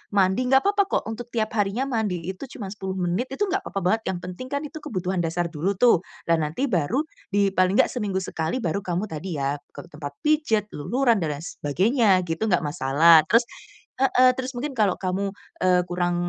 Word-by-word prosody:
mandi, 195 +6 +2
nggak 265 +1 +4
papa 400 0 +2
kok - - 0
untuk 235 +2 -7
tiap 225 -2 -2
harinya 205 +5 +1
mandi 220 -10 -2
itu 185 +2 -6 0.2
cuma 200 -7 -6
10 190 -2 -5
menit, 180 +9 -1
itu - - 0
nggak 390 +1 -1
papa 195 - -3
banget. 220 +5 +2
Yang - - -5
penting 255 +8 -8
kan 280 +2 -2
itu 315 +2 -7
kebutuhan 185 - -3
dasar 170 0 -1
dulu 175 +6 -1
tuh, 235 -3 +5 0.2
dan 165 -1 +2
nanti 160 - -2
baru 185 - +1 0.2
di 200 -1 +2
paling 185 0 +2
nggak - - +4
seminggu 200 -6 -2
sekali 165 +8 -3
baru 170 +3 0
kamu 185 +1 -3
tadi 160 +2 -5
ya, 140 +1 -1 0.2
ke 145 - -10
tempat 145 -1 -7
pijat, 295 -9 +1
luluran 235 - +1
dan 155 -4 -2
lain 145 - -9
sebagainya 190 - +2
gitu, 170 +5 -2
enggak 180 -5 +2
masalah. 155 +2 +5
Terus 230 +6 +5 0.5
heeh, 255 -1 +5
terus 260 0 -4
mungkin 260 +2 -5
kalau 205 -4 +3
kamu, 195 +2 -2 0.2
eee, 180 -1 +3
kurang 175 0 0
195 Hz, 200 wpm, -24 LUFS, 170-240 Hz, 0.5 s, tuh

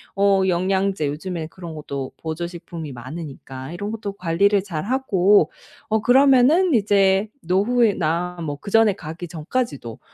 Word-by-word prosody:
어 195 -1 +3
영양제 190 -2 0
요즘에 160 +2 -4
그런 170 -1 -9
것도 140 -3 -6
보조 160 +2 -4
식품이 170 -4 -8
많으니까 135 +1 -8
이런 205 +4 -4
것도 215 -3 -5
관리를 200 +2 +2
잘하고 200 - +2 0.4
어 220 0 +1
그러면은 275 - +5
이제 200 -1 +3
노후에나 180 -4 +1
뭐 145 -3 -3
그전에 215 +5 +2
가기 165 -1 -8
전까지도 155 - -4
185 Hz, 300 characters per minute, -22 LUFS, 160-205 Hz, 0.4 s, 그러면은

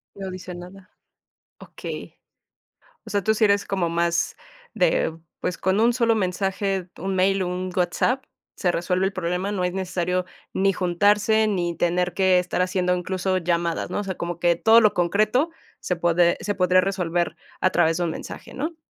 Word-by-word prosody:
No 195 -1 -6
dice 185 -1 -7
nada. 185 +2 -11 0.7
Okey. - - -8 0.9
O 220 - -10
sea, 200 -2 0
tú 220 - +3
sí 220 +1 0
eres 200 0 +2
como 185 -4 -1
más 170 0 0 0.4
de, 160 0 +1 0.2
pues, 180 - -2
con 190 +3 +1
1 235 +1 +4
solo 230 -2 +2
mensaje, 195 -1 -1
1 190 +1 -3
mail 195 +1 +2
o 185 - -1
1 180 +1 -3
WhatsApp, 190 +9 +1 0.3
se 180 -4 +1
resuelve 180 +2 0
el 195 - -1
problema, 180 +2 -2
no 185 -3 -1
es 180 0 -1
necesario 180 -1 -1 0.3
ni 195 0 +2
juntarse, 205 +5 +2
ni 175 -4 -1
tener 180 +1 +1
que 190 -2 +4
estar 180 0 -1
haciendo 180 0 +1
incluso 185 +1 -1
llamadas, 170 -1 -1
¿no? - - -1
O - - -2
sea, 190 -2 -4
como 170 0 -4
que 175 0 +3
todo 225 +6 +6
lo 215 - +4
concreto 215 - +2 0.3
se 180 - -2
pode 170 0 +3
se 205 +1 -2
podría 185 0 +4
resolver 175 -3 -1 0.3
a 185 - +4
través 165 -2 +2
de 180 - 0
un 170 - 0
mensaje, - - -8
¿no? 310 +5 -4
185 Hz, 180 wpm, -24 LUFS, 175-200 Hz, 0.9 s, todo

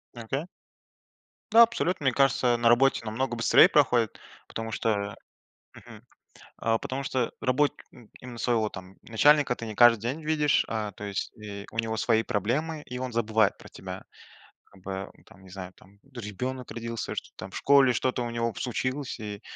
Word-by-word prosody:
Ага. 130 +7 -4 1.1
Да, 230 +1 +8
абсолютно, 185 -9 -1
мне 135 - +3
кажется, 125 -2 +3
на 120 0 +3
работе 120 0 +3
намного 120 +3 -2
быстрее 115 - +6
проходит, 125 -7 +2 0.3
потому 115 0 -5
что 100 -2 -1 0.6
э, - - -11
мгм, - - -13 0.7
э, 115 0 +2
потому 130 +4 -4
что 130 -4 -1
работник 145 +3 +1
им 120 -5 -17
именно 125 -2 -9
своего 115 -3 +1
там 95 -1 -11
начальника 140 +3 +3
ты 115 - -7
не 110 - -6
каждый 120 -1 +6
день 130 +7 -3
видишь, 150 -2 +2
а, 110 -2 -3
то 105 - -9
есть, 100 -1 -4
э, 100 -1 -7
у 115 - -9
него 115 -1 -1
свои 110 0 +2
проблемы, 145 - -2
и 125 -2 -7
он 130 -1 -4
забывает 110 -2 +2
про - - -13
тебя. - - -9 0.6
Как 95 -2 -21
бы, 95 0 -5
ну - - -24
там, 95 - -18
не 95 - -15
знаю 90 -1 -8
там. 100 +2 -21
Тот 120 - -8
же 105 - -5
ребёнок 125 +4 -5
родился, 115 -1 -5
что-то - - -6
там - - -8
в - - -9
школе 140 -2 +5
что-то 125 +1 -1
у 120 - -4
него 115 0 -1
случилось, 130 +2 -3
и 105 -2 -6
115 Hz, 185 wpm, -27 LUFS, 110-130 Hz, 1.1 s, Да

